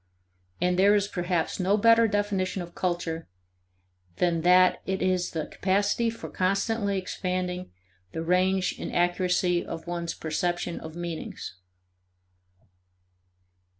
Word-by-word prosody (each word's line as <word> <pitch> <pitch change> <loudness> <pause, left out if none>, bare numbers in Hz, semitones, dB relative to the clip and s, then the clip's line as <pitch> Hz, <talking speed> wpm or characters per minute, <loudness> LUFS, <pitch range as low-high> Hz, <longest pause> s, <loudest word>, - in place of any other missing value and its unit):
And 180 0 +1
there 200 +2 +6
is 205 -1 +2
perhaps 175 -3 -1
no 190 +3 +2
better 230 +1 +5
definition 200 -3 -1
of 170 0 -11
culture 175 -2 -2 0.9
than 170 - +1
that 180 +2 +5
it 190 0 -1
is 185 -1 +1
the 160 -2 -3
capacity 205 +6 +1
for 230 - -7
constantly 200 +2 0
expanding 185 -1 -3 0.4
the 160 - -4
range 185 +2 +1
and - - -4
accuracy 175 0 +1
of 165 - -7
one's 170 -1 -3
perception 175 +2 -2
of 160 0 -9
meanings. 170 - -5
180 Hz, 115 wpm, -27 LUFS, 175-195 Hz, 0.9 s, there